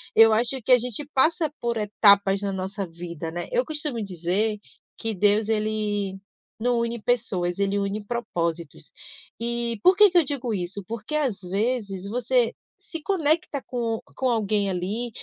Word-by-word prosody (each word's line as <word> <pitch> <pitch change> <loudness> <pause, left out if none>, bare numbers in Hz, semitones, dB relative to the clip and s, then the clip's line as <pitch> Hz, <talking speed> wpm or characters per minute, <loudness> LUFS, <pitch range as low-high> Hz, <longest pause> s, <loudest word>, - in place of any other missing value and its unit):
Eu 225 0 +8
acho 240 +4 +1
que 255 - 0
a 250 - +9
gente 250 +3 -4
passa 315 +3 +3
por 235 0 -1
etapas 200 -2 +4
na 200 -1 -2
nossa 190 +1 -3
vida, 170 -1 -7
né? 175 +2 -5
Eu - - +1
costumo 300 -6 -3
dizer 195 +3 -1 0.4
que 225 0 -3
Deus 210 +2 +2
ele 210 -2 -1 0.4
não 240 +1 +1
une 235 0 -2
pessoas, 200 -7 0
ele 200 0 +1
une 200 +1 -2
propósitos. 170 -9 -3 0.4
E 235 -1 -2
por 370 +1 +6
que 420 -1 +8
que 355 - +2
eu 340 - +6
digo 260 -4 -3
isso? 195 +1 -3
Porque 230 +5 -6
às 260 -10 0
vezes 200 0 -2
você 240 +2 +1 0.3
se 330 - -8
conecta 315 -5 +1
com 230 -3 -2 0.2
com 260 - 0
alguém 210 -3 +1
ali 195 +7 -2
220 Hz, 160 wpm, -25 LUFS, 195-245 Hz, 0.4 s, a